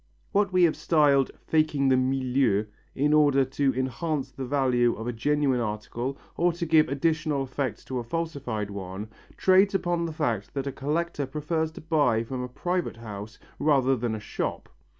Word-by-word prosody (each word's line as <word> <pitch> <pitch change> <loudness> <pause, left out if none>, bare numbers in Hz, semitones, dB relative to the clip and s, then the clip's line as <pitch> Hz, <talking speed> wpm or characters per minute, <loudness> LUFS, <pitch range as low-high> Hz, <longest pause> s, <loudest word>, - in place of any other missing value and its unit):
What 200 -2 +2
we 185 -1 +4
have 165 -3 +4
styled 150 -4 +3 0.2
"faking 155 -3 +2
the 130 - +5
milieu," 130 -4 +1 0.3
in 145 +2 +2
order 145 -3 +5
to 135 +1 +1
enhance 135 +3 -2
the 130 -2 -6
value 125 -3 +2
of 110 - -6
a 120 - -2
genuine 140 +2 +1
article 120 +4 -3 0.2
or 175 +1 +2
to 170 0 -3
give 160 -1 +4
additional 155 0 0
effect 130 -4 -4
to 130 -1 -3
a - - -4
falsified 125 -7 -3
one, 100 +2 -6 0.3
trades 190 +1 +4
upon 175 -2 0
the 160 - -5
fact 120 -10 -2
that 135 -1 -2
a 140 - -2
collector 150 +1 -2
prefers 155 +3 -2
to - - -10
buy 145 -8 +2
from 125 +2 -5
a 125 - -4
private 175 +1 -2
house 110 -1 -8 0.2
rather 135 -3 +3
than 120 -2 -2
a - - -5
shop. - - -4
135 Hz, 175 wpm, -27 LUFS, 125-155 Hz, 0.3 s, the